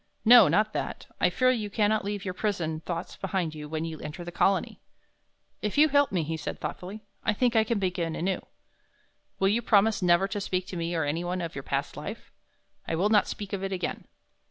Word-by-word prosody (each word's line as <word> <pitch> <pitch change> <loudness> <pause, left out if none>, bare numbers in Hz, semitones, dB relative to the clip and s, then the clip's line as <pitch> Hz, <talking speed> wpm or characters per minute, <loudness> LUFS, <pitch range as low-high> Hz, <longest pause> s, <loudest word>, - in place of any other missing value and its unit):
"No, 235 -2 +9
not 215 +1 +2
that; - - -4
I - - +4
fear 255 0 +3
you 215 -5 -2
cannot 215 0 +1
leave 205 0 -4
your 185 - -2
prison 175 -6 -2
thoughts 170 +1 -5
behind 185 -4 -2
you 150 -1 -8
when 160 +1 -2
you 160 -2 -6
enter 150 +4 -7
the 175 - -7
Colony." 190 +3 +1 0.8
"If 210 +4 -2
you 305 +1 +6
help 285 0 +3
me," 180 -4 0
he 160 +1 -3
said, - - -5
thoughtfully, 200 +4 -6 0.2
"I 210 - +2
think 240 +2 +1
I 220 - +5
can 225 +1 -1
begin 180 -4 -1
anew." 185 +2 -1 0.9
"Will 195 - +3
you 225 +4 +2
promise 215 -1 +3
never 175 +1 +4
to 205 0 -3
speak 185 -2 -1
to - - -6
me 170 0 -2
or 160 - +1
anyone 175 +5 -2
of 170 -2 -4
your 135 - -5
past - - -3
life?" - - -7 0.6
"I - - -1
will 190 +6 +2
not 210 -1 +4
speak 205 -2 -6
of 195 -1 -2
it 195 - -2
again." 180 -2 -3
190 Hz, 215 wpm, -28 LUFS, 170-210 Hz, 0.9 s, No